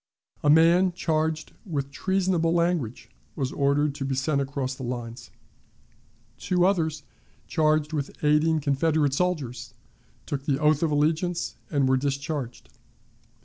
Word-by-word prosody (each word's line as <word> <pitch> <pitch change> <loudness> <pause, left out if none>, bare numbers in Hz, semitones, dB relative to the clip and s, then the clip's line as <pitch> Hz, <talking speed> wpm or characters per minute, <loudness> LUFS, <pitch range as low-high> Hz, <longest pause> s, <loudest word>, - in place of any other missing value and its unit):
A 145 - +2
man, 170 +4 +5
charged 160 -2 -1
with 140 - -4
treasonable 185 0 0
language, 170 -8 -1 0.2
was 135 -3 -2
ordered 140 +1 +1
to 140 -1 -5
be 135 0 -1
sent 140 +2 0
across 135 -1 -3
the 130 - -10
lines. 120 -1 -6 1.1
Two 180 -1 +1
others, 160 -5 0 0.4
charged 155 -1 +1
with 145 -2 -2
aiding 150 +1 +3
Confederate 145 0 +1
soldiers, 135 -7 -2 0.5
took 140 -1 -4
the 140 -3 +2
oath 150 0 +2
of 165 - +2
allegiance 160 +4 0 0.2
and 140 -4 +1
were 130 0 +3
discharged. 140 -1 -3
150 Hz, 130 wpm, -26 LUFS, 135-165 Hz, 1.1 s, man